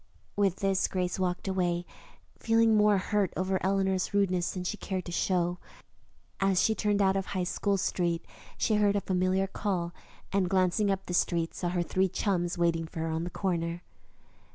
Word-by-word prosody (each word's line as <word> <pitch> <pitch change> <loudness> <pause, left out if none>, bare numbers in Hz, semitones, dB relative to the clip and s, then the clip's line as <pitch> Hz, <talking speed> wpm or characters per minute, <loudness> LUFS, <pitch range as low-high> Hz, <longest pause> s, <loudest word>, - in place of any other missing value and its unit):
With 200 -3 +2
this, 195 -1 +2
Grace 180 0 -2
walked 180 0 -1
away, 175 -2 0 0.5
feeling 225 -1 +3
more 210 -1 +5
hurt 195 -1 0
over 190 0 0
Eleanor's 190 0 0
rudeness 185 -3 +2
than 185 - -4
she 180 - -2
cared 190 -3 -4
to 175 - -6
show. 175 0 0 0.8
As 195 -2 +2
she 220 - +3
turned 205 -2 +1
out 190 0 +3
of 195 -1 -1
High 185 -2 -2
School 200 +2 0
Street 170 -2 -1 0.3
she 215 - +2
heard 205 -1 +3
a 200 - +1
familiar 185 +1 +1
call, 185 -3 -2 0.4
and, 190 -2 +2
glancing 190 +2 +2
up 195 0 -1
the 180 - -5
street, 170 -1 +1
saw 175 - -2
her 175 0 0
three 190 +2 +1
chums 175 -2 -1
waiting 165 -1 +1
for 160 - -6
her 165 - -1
on 160 +1 -2
the - - -4
corner. 170 -2 -2
185 Hz, 180 wpm, -29 LUFS, 175-195 Hz, 0.8 s, more